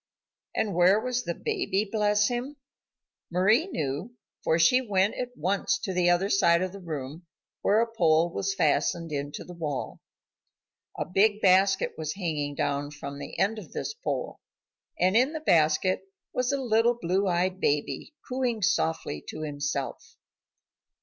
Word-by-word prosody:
And 210 Hz, -3 st, 0 dB
where 180 Hz, +4 st, +5 dB
was 250 Hz, +1 st, -2 dB
the 170 Hz, -, -2 dB
baby, 365 Hz, -, -1 dB
bless 210 Hz, -1 st, +2 dB
him? 250 Hz, +4 st, -3 dB, 0.7 s
Mari 210 Hz, -, +3 dB
knew, 160 Hz, -, -4 dB, 0.3 s
for 160 Hz, -, +2 dB
she 210 Hz, +11 st, +5 dB
went 200 Hz, -4 st, +1 dB
at 250 Hz, 0 st, -5 dB
once 200 Hz, +4 st, 0 dB
to 195 Hz, -2 st, -4 dB
the 180 Hz, -1 st, +3 dB
other 175 Hz, +2 st, +3 dB
side 175 Hz, -3 st, +3 dB
of 185 Hz, -, -3 dB
the 200 Hz, -, -9 dB
room 155 Hz, 0 st, -6 dB, 0.3 s
where 210 Hz, +3 st, +3 dB
a 230 Hz, 0 st, -1 dB
pole 165 Hz, -3 st, +3 dB
was 195 Hz, 0 st, -1 dB
fastened 165 Hz, -3 st, +1 dB
into 145 Hz, 0 st, -4 dB
the 180 Hz, -, -10 dB
wall. 150 Hz, -6 st, -4 dB, 1.0 s
A -, -, -2 dB
big 205 Hz, +4 st, +3 dB
basket 195 Hz, 0 st, +4 dB
was 155 Hz, -1 st, -3 dB
hanging 150 Hz, -6 st, -2 dB
down 140 Hz, 0 st, -1 dB
from 140 Hz, -1 st, -8 dB
the -, -, -8 dB
end 215 Hz, +3 st, +1 dB
of 190 Hz, -, -12 dB
this -, -, -3 dB
pole, 470 Hz, +2 st, -4 dB, 0.6 s
and 185 Hz, +3 st, +3 dB
in 260 Hz, +6 st, +4 dB
the 315 Hz, -, -3 dB
basket 170 Hz, -, +2 dB, 0.3 s
was 250 Hz, +1 st, 0 dB
a 280 Hz, -, 0 dB
little 235 Hz, -1 st, +2 dB
blue 190 Hz, 0 st, 0 dB
eyed 180 Hz, +1 st, 0 dB
baby, 150 Hz, -, -1 dB
cooing 250 Hz, -4 st, -1 dB
softly 160 Hz, -, 0 dB
to -, -, -6 dB
himself. 145 Hz, -2 st, -4 dB
185 Hz, 155 wpm, -27 LUFS, 160-220 Hz, 1.0 s, where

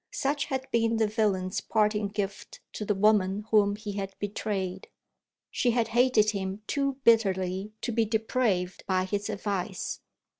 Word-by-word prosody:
Such 285 Hz, +1 st, -1 dB
had 265 Hz, -1 st, -3 dB
been 230 Hz, -1 st, +2 dB
the 220 Hz, -, +3 dB
villain's 205 Hz, -3 st, 0 dB
parting 210 Hz, -1 st, +1 dB
gift 200 Hz, -1 st, -5 dB
to 210 Hz, -, -4 dB
the 210 Hz, -, +1 dB
woman 205 Hz, 0 st, +2 dB
whom 205 Hz, -2 st, +4 dB
he 210 Hz, 0 st, -6 dB
had 195 Hz, -1 st, -5 dB
betrayed. 195 Hz, -2 st, -3 dB, 0.6 s
She 245 Hz, -, +1 dB
had 235 Hz, -1 st, +1 dB
hated 240 Hz, -3 st, +4 dB
him 195 Hz, 0 st, -4 dB
too 275 Hz, +2 st, 0 dB
bitterly 195 Hz, -3 st, +2 dB
to 240 Hz, -, -2 dB
be 225 Hz, 0 st, +2 dB
depraved 220 Hz, -4 st, 0 dB
by 185 Hz, -1 st, +1 dB
his 205 Hz, +2 st, -2 dB
advice. 200 Hz, -2 st, -3 dB
210 Hz, 150 wpm, -28 LUFS, 195-225 Hz, 0.6 s, whom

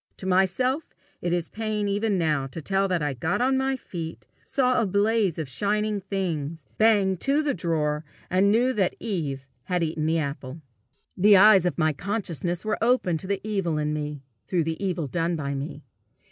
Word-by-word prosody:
To -, -, -8 dB
myself 190 Hz, -, +1 dB, 0.3 s
it 175 Hz, -, -1 dB
is 175 Hz, -1 st, 0 dB
pain 215 Hz, -1 st, -2 dB
even 205 Hz, 0 st, 0 dB
now 150 Hz, -5 st, +1 dB
to 135 Hz, -, -7 dB
tell 195 Hz, +4 st, +1 dB
that 180 Hz, -4 st, 0 dB
I 145 Hz, -1 st, 0 dB
got 160 Hz, +7 st, -1 dB
on 260 Hz, +2 st, +2 dB
my 265 Hz, 0 st, +1 dB
feet, 165 Hz, -9 st, -7 dB, 0.2 s
saw 255 Hz, -2 st, +2 dB
a 220 Hz, -, +1 dB
blaze 200 Hz, -1 st, +2 dB
of 160 Hz, -3 st, -3 dB
shining 210 Hz, +8 st, 0 dB
things, 165 Hz, -6 st, -3 dB
banged 205 Hz, -4 st, +4 dB
to 285 Hz, +3 st, +2 dB
the 290 Hz, -, +1 dB
drawer, 155 Hz, -3 st, -1 dB, 0.2 s
and 190 Hz, +2 st, +3 dB
knew 245 Hz, +4 st, +3 dB
that 195 Hz, -6 st, +1 dB
Eve 145 Hz, -, -3 dB, 0.2 s
had 180 Hz, -2 st, 0 dB
eaten 155 Hz, -1 st, -1 dB
the 165 Hz, +1 st, +2 dB
apple. 140 Hz, 0 st, -4 dB, 0.5 s
The 200 Hz, +2 st, +6 dB
eyes 195 Hz, -2 st, +7 dB
of 175 Hz, -, -2 dB
my 155 Hz, -2 st, +2 dB
consciousness 180 Hz, -1 st, -3 dB
were 215 Hz, 0 st, -1 dB
opened 225 Hz, -9 st, +2 dB
to 190 Hz, -, -4 dB
the 200 Hz, 0 st, -1 dB
evil 195 Hz, -7 st, -1 dB
in 150 Hz, 0 st, -1 dB
me, 150 Hz, -2 st, -4 dB, 0.2 s
through 175 Hz, -3 st, +1 dB
the 160 Hz, +4 st, -3 dB
evil 175 Hz, -5 st, -1 dB
done 165 Hz, +5 st, -1 dB
by 140 Hz, -3 st, -3 dB
me. 140 Hz, +2 st, -5 dB
180 Hz, 190 wpm, -25 LUFS, 155-210 Hz, 0.5 s, eyes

